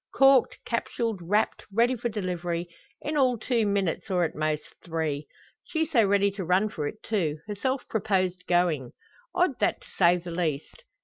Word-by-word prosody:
Corked, 270 -2 +5
capsuled, 230 -2 -2
wrapped, 205 +6 +1
ready 235 +5 +3
for 240 0 -2
delivery 175 -4 -3 0.4
in 305 - -2
all 255 -3 +3
two 225 -1 +1
minutes, 200 -2 -1
or 180 -2 +2
at 165 - -1
most, 155 0 -1 0.2
three! 160 -3 -2 0.4
She 320 -1 -1
so 270 -8 +3
ready 200 0 +3
to 195 -1 -5
run 185 +5 +2
for 150 -8 -3
it, 215 +8 -8
too 170 -9 0
herself 250 +6 -2
proposed 185 -4 0
going! 170 -8 +1 0.4
Odd, - - +2
that - - +1
to - - -16
say 175 +1 +6
the 175 0 -7
least. 165 - -3
195 Hz, 170 wpm, -27 LUFS, 170-225 Hz, 0.4 s, say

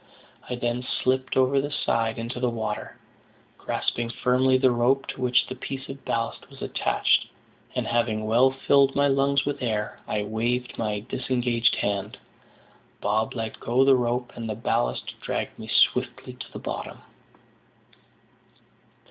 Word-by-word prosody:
I 125 - -1
then 120 0 -1
slipped 130 +1 0
over 130 +1 +4
the 145 - -3
side 115 -5 0
into 115 +2 -4
the 125 0 +1
water, 110 -2 -4 0.6
grasping 120 0 -2
firmly 130 +2 +3
the 130 -1 +4
rope 125 +3 +2
to - - -6
which 125 -1 +3
the - - -6
piece 130 +1 -6
of 135 0 -8
ballast 115 0 -2
was - - -14
attached; - - +1 0.5
and, - - 0
having 115 -2 0
well 120 +4 +5
filled 135 +1 +3
my 140 0 +4
lungs 140 0 +2
with 145 -1 -2
air, 110 -4 -2
I 105 -1 -1
waved 120 +4 -1
my 105 -2 -1
disengaged 120 -2 +1
hand. 100 -1 -2 0.8
Bob 110 +3 0
let 110 -2 -4
go 125 +3 +3
the 135 -1 +7
rope, 125 0 0
and 115 -1 -5
the 110 - -2
ballast - - -1
dragged - - -3
me - - -7
swiftly - - +1
to - - -10
the - - -7
bottom. - - -6
120 Hz, 150 wpm, -26 LUFS, 115-130 Hz, 0.8 s, the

